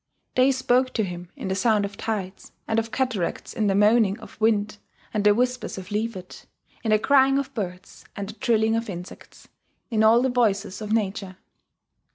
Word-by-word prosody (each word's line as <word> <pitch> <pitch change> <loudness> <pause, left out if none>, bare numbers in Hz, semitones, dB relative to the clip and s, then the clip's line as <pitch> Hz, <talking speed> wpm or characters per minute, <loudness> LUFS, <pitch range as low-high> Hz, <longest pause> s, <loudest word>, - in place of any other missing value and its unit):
They 255 +2 +4
spoke 255 0 +1
to 220 - +1
him 175 -2 -6
in - - -6
the 190 - 0
sound 205 +1 +2
of 200 0 -7
tides 200 -4 -5
and 225 0 +1
of 225 0 -4
cataracts 250 -9 -2
in 215 -2 0
the 195 - +2
moaning 210 0 +4
of 220 - -14
wind 215 -1 +1 0.3
and 210 - 0
the 210 0 +5
whispers 250 -1 -1
of 190 +2 -8
leafage, 210 -3 -4 0.4
in 225 - -1
the 215 - +5
crying 270 +3 +4
of 275 -1 -3
birds, 185 -6 -6
and 200 -1 -5
the - - -7
trilling 225 -2 +1
of 230 -1 -2
insects, 180 -1 -10 0.4
in 220 -1 +2
all 230 +3 +6
the 260 - +2
voices 215 -5 0
of 215 0 -5
nature. 195 -3 -1
215 Hz, 190 wpm, -24 LUFS, 200-235 Hz, 0.4 s, all